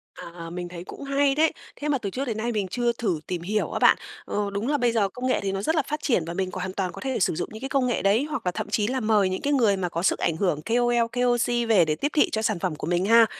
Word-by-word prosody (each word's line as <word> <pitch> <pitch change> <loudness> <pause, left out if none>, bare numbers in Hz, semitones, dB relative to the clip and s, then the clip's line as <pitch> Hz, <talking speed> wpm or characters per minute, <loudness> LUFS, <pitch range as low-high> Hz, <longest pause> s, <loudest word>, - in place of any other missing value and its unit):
À, 170 -1 -9
mình 175 +1 -5
thấy 175 -1 -8
cũng 280 - -9
hay 275 0 +2
đấy, 315 +1 +3 0.2
thế 295 - -5
mà 280 - +2
từ 205 -5 -4
trước 265 +7 -3
đến 225 -4 -3
nay 235 +2 -1
mình 205 -4 -1
chưa 240 +5 0
thử 205 -9 -1
tìm 180 -2 -3
hiểu 210 +5 -1
á - - -2
bạn. - - +6 0.3
Ờ, 205 -1 -2
đúng 205 +5 -2
là 290 - +2
bây 245 -3 +2
giờ 210 -4 +1
công 255 +1 -4
nghệ 255 - +2
thì 195 - -1
nó 195 0 -2
rất 320 +10 0
là 310 - +3
phát 300 0 -2
triển 230 - +2
và 170 - -4
mình 185 0 -2
còn 185 - -5
hoàn 185 0 -4
toàn 190 -2 -2
có - - -10
thể 265 -3 -2
sử 180 - +2
dụng 175 - -3
những 220 +2 -9
cái 270 - -4
công 265 -2 +1
nghệ 245 - 0
đấy, 205 +7 +3
hoặc 295 -9 -4
là 180 - +1
thậm 190 - -5
chí 210 0 +1
là 260 +1 -1
mời 215 -4 +3
những 185 - -3
cái 290 - 0
người 225 -8 +3
mà 180 -2 -2
có 170 0 -3
sức - - +2
ảnh 165 - 0
hưởng 160 -6 0
KOL, 240 0 +2
KOC 240 -1 +1
về 185 -7 +5
để 155 -1 0
tiếp 290 - -2
thị 300 - +4
cho 220 - -1
sản 215 -5 0
phẩm 180 -4 -2
của - - -6
mình 175 +2 +1
ha. 230 +1 +7
220 Hz, 325 wpm, -25 LUFS, 185-250 Hz, 0.3 s, ha